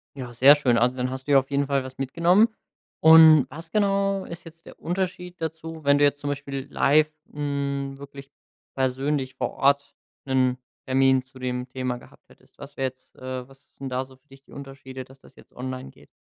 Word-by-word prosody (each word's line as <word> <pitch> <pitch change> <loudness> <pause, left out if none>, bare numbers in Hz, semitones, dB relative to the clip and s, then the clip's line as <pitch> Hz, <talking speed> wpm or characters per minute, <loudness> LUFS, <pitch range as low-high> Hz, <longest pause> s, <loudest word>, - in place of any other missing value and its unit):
Ja, 125 -3 -7
sehr 135 +5 +7
schön. 125 -5 +2
Also, 125 +2 +2
dann 125 0 -1
hast 130 +1 -7
du - - 0
ja 135 - +8
auf 135 - -7
jeden 140 0 +1
Fall 140 -2 0
was 130 0 -10
mitgenommen. 170 - +3 0.5
Und 160 -3 +8
was 165 +4 -10
genau 195 -2 +1
ist 170 0 -9
jetzt 165 0 -15
der - - -13
Unterschied 180 0 -4
dazu, 160 0 -6
wenn 140 0 +5
du 145 - +3
jetzt 145 0 +3
zum 145 - -4
Beispiel 140 -1 -5
live, 155 +2 +3 0.2
hm, 140 -1 -3
wirklich 140 0 -11 0.5
persönlich 130 +1 -1
vor - - -2
Ort 140 +1 +1 0.3
'nen 130 -1 +1 0.3
Termin 130 0 +3
zu 130 0 -17
dem 125 0 -3
Thema 130 -1 -3
gehabt - - -19
hättest? - - -23
Was 140 - -11
wär 135 - -1
jetzt 130 0 -8
äh, 130 -1 -6
was 135 +1 -22
sind 135 -1 -6
da 130 +1 -2
so 130 0 -17
für 140 +3 -44
dich 135 0 -18
die - - -23
Unterschiede, 135 -1 -9
dass 135 +1 -18
das - - -20
jetzt - - -19
online 130 - -6
geht? - - -20
135 Hz, 205 wpm, -24 LUFS, 130-150 Hz, 0.5 s, ja